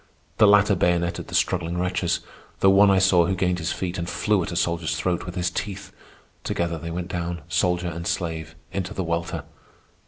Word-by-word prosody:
The 105 - +7
latter 100 0 +5
bayoneted 85 -1 0
the - - -5
struggling 85 -1 0
wretches, 90 -1 0 0.4
though 95 - +5
one 100 +1 +6
I 95 - +4
saw 90 -3 +4
who 95 - 0
gained 90 -1 0
his 80 0 -2
feet 90 -1 -3
and 85 0 -3
flew 95 +3 +1
at 100 - -4
a - - -4
soldier's 85 -2 0
throat 85 +1 -1
with 90 - -6
his 90 -1 0
teeth. 100 +2 -5 0.5
Together 85 -1 -2
they 85 - -6
went 85 +1 -4
down, 85 -3 -4
soldier 90 +1 +1
and 85 +1 -5
slave, 80 -2 -3 0.2
into 95 +1 -4
the 95 - -1
welter. 85 -1 -2
90 Hz, 195 wpm, -24 LUFS, 85-95 Hz, 0.5 s, The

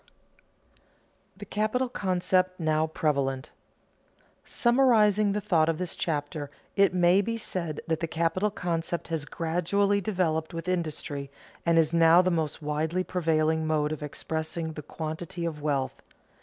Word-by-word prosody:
[Sidenote: 190 0 -36
The 205 - -8
capital 215 +6 0
concept 185 -4 0
now 155 -1 +1
prevalent] 140 -4 -1 0.9
Summarizing 220 -5 +3
the 210 - -1
thought 165 -6 +2
of 165 - 0
this 180 0 -4
chapter, 145 -2 -3 0.3
it 200 -1 +5
may 180 +1 +4
be 230 +3 -2
said 170 -8 -4
that 160 -1 -1
the 165 - -2
capital 170 +6 0
concept 170 -3 -3
has 160 -3 -2
gradually 180 +6 0
developed 170 -5 -1
with 165 +2 -5
industry, 155 -5 -2 0.4
and 165 0 +4
is 160 0 +3
now 165 +1 +6
the 185 - +1
most 160 -2 -2
widely 155 +4 -1
prevailing 160 -3 +1
mode 150 -1 +1
of 155 - -4
expressing 160 +2 -4
the 150 - -6
quantity 170 +3 -5
of 155 -3 -4
wealth. 140 -3 -1
165 Hz, 140 wpm, -27 LUFS, 155-185 Hz, 0.9 s, now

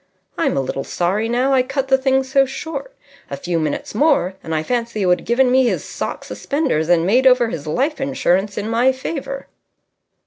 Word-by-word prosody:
I'm - - 0
a - - +2
little 135 +1 -3
sorry 200 +6 -1
now 255 +3 +1
I 260 - +5
cut 270 +1 -3
the 265 - +5
thing 265 0 +2
so 270 +1 +3
short. 320 - -6 0.3
A 140 - -5
few 170 +3 -2
minutes 155 -2 -3
more, 225 - +2
and 160 - -4
I 155 - 0
fancy 235 0 -2
he - - +1
would 180 0 +3
have - - -15
given 250 +2 +3
me 260 0 +4
his - - -1
sock - - -5
suspenders 275 - -1
and 170 -1 +3
made 250 +7 +4
over 250 -2 +4
his 155 -6 -6
life 275 - -1
insurance 205 -8 0
in 205 - -2
my 235 +3 +3
favour." 275 0 -5
245 Hz, 205 wpm, -19 LUFS, 180-270 Hz, 0.3 s, I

